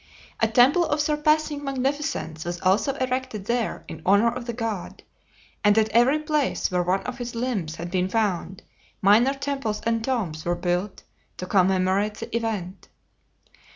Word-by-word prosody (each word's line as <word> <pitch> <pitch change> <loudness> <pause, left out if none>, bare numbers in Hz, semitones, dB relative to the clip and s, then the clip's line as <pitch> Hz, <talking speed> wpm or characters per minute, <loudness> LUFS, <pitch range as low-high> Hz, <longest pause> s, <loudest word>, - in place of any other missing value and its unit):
A 225 - +3
temple 250 +9 +5
of 295 - 0
surpassing 300 0 +1
magnificence 270 - -2
was 175 0 -4
also 195 +9 +2
erected 255 -5 -3
there 235 0 -2
in 160 - -8
honor 200 +5 +4
of 250 -1 -6
the - - -1
god, 225 -5 -5 0.6
and 205 0 +4
at 220 0 +3
every 240 +7 +4
place 305 - -1
where 180 0 +1
one 180 +2 +1
of 250 0 -6
his 240 -1 -5
limbs 225 -10 -2
had 170 +1 -6
been 185 0 0
found 195 -4 -1 0.4
minor 225 +8 +4
temples 275 -6 -3
and 230 -1 0
tombs 200 -12 -2
were 175 0 0
built 180 +3 -2 0.3
to 180 - -5
commemorate 190 +2 +2
the - - -7
event. 205 -5 -3
225 Hz, 155 wpm, -24 LUFS, 185-260 Hz, 0.6 s, temple